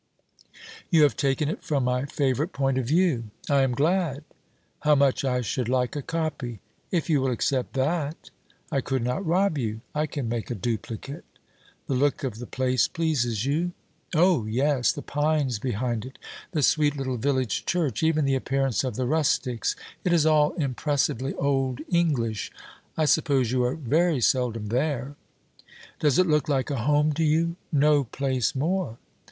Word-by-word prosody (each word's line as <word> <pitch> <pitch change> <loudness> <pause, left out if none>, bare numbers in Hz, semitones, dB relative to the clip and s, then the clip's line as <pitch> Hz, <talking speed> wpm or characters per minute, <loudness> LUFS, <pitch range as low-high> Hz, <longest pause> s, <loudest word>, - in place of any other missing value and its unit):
'You 165 -4 +5
have 145 - +4
taken 140 +1 0
it 155 - -4
from 140 -4 0
my 125 +1 0
favourite 140 +4 -1
point 135 -1 +1
of 125 - -3
view.' 155 -6 +2 0.3
'I 140 -1 +4
am 135 -1 +2
glad.' 155 -1 +1 0.6
'How 150 0 +4
much 140 -1 +2
I 125 -2 +1
should 125 0 -2
like 125 0 0
a 145 - -2
copy!' 145 -8 -3 0.3
'If 170 -4 0
you 150 -5 +2
will 135 - +1
accept 125 +1 -1
that?' 150 +3 -2 0.4
'I 135 - +1
could 130 -1 -2
not 125 +10 -1
rob 180 -2 +1
you.' 110 -2 -3
'I 150 +1 0
can 140 -5 -4
make 115 -1 -3
a 120 - -2
duplicate.' 115 +5 -4 0.6
'The - - -2
look 140 +3 +1
of 120 -5 -3
the 120 - -7
place 130 -2 +1
pleases 125 -9 -1
you?' 165 +6 0 0.4
'Oh! 165 - +3
yes; 130 +2 +2
the 145 - -7
pines 145 -5 0
behind 120 -1 -2
it; 130 +2 -10 0.3
the 155 -6 -1
sweet 150 0 +3
little 130 -2 -2
village 130 -2 -1
church; 160 -10 0
even 160 -2 +2
the 135 - +2
appearance 135 -1 0
of 130 - -3
the 130 - -1
rustics; 135 -4 0 0.3
it 180 - +1
is 165 -3 +4
all 150 -1 +4
impressively 140 -3 -1
old 135 -2 0
English. 140 - 0 0.5
I 155 - +2
suppose 140 -6 +2
you 125 -1 +2
are 125 - 0
very 160 +2 +1
seldom 115 -2 +1
there?' 135 +2 -1 0.8
'Does 145 -4 +2
it 185 - +5
look 150 -1 +1
like 135 0 0
a 140 - -1
home 150 +1 +3
to 160 - 0
you?' 165 +2 +2 0.2
'No 145 -1 +4
place 130 +1 -1
more!' 160 -4 -1
140 Hz, 170 wpm, -26 LUFS, 125-155 Hz, 0.8 s, You